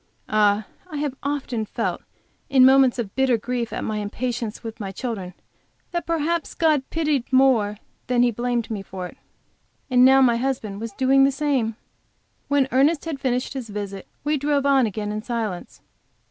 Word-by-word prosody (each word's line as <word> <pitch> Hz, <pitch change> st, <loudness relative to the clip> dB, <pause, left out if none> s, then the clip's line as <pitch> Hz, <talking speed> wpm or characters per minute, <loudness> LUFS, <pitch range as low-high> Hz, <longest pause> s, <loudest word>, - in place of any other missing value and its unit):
Ah, 210 Hz, -1 st, +3 dB, 0.2 s
I 305 Hz, -, -5 dB
have 290 Hz, -2 st, -2 dB
often 275 Hz, -5 st, -2 dB
felt 215 Hz, -, -3 dB, 0.5 s
in 265 Hz, -2 st, +6 dB
moments 265 Hz, -1 st, +5 dB
of 220 Hz, -5 st, -4 dB
bitter 265 Hz, -3 st, +2 dB
grief 235 Hz, +1 st, -3 dB
at -, -, -4 dB
my 215 Hz, -, -2 dB
impatience 230 Hz, +2 st, -3 dB
with 225 Hz, -1 st, -7 dB
my 195 Hz, -3 st, -4 dB
children, 195 Hz, -5 st, -5 dB, 0.6 s
that 345 Hz, -1 st, -3 dB
perhaps 330 Hz, 0 st, -1 dB
God 310 Hz, -4 st, +3 dB
pitied 300 Hz, -6 st, -1 dB
more 250 Hz, -6 st, +3 dB, 0.3 s
than 245 Hz, -1 st, +3 dB
He 245 Hz, -, +3 dB
blamed 240 Hz, 0 st, -2 dB
me 210 Hz, -3 st, -3 dB
for 185 Hz, -1 st, -7 dB
it! 180 Hz, -, -10 dB, 0.7 s
And 250 Hz, 0 st, +6 dB
now 265 Hz, +1 st, +7 dB
my 240 Hz, -3 st, +4 dB
dear -, -, -4 dB
husband 220 Hz, -6 st, -3 dB
was 230 Hz, -1 st, -4 dB
doing 270 Hz, +3 st, +4 dB
the 275 Hz, -, +4 dB
same! 270 Hz, -6 st, 0 dB, 0.7 s
When 280 Hz, -2 st, +2 dB
Ernest 285 Hz, +5 st, +3 dB
had 315 Hz, -4 st, -4 dB
finished 255 Hz, -1 st, -1 dB
his 255 Hz, -5 st, -6 dB
visit 200 Hz, -2 st, -6 dB, 0.2 s
we 300 Hz, +1 st, +1 dB
drove 285 Hz, 0 st, 0 dB
on 270 Hz, -4 st, +4 dB
again 210 Hz, 0 st, -4 dB
in 210 Hz, 0 st, -3 dB
silence. 220 Hz, -6 st, -4 dB
250 Hz, 175 wpm, -23 LUFS, 215-275 Hz, 0.7 s, now